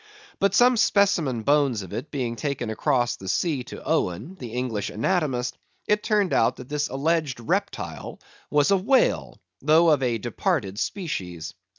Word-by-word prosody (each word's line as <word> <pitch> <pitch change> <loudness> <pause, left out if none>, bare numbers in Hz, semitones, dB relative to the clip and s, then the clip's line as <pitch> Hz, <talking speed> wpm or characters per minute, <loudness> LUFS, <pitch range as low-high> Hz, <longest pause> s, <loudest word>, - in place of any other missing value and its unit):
But 195 0 +2
some 245 +3 +5
specimen 175 - +2
bones 140 -6 +2
of 95 - -10
it 120 +7 -5
being 125 -5 -3
taken 125 -4 -3
across 120 0 +1
the 95 - -10
sea 145 - 0
to - - -9
Owen, 135 - -1
the 125 -11 -9
English 120 -5 -2
Anatomist, 125 - -1 0.3
it 210 0 +2
turned 210 -4 +1
out 115 - +3
that 125 - -11
this 150 0 -1
alleged 145 -1 0
reptile 115 - -3 0.3
was 145 +2 +3
a 195 - +5
whale, 245 +8 +1 0.2
though 160 +2 +5
of 145 -3 +3
a 120 -3 +1
departed 105 -3 -2
species. 90 - -4
135 Hz, 160 wpm, -25 LUFS, 115-170 Hz, 0.3 s, some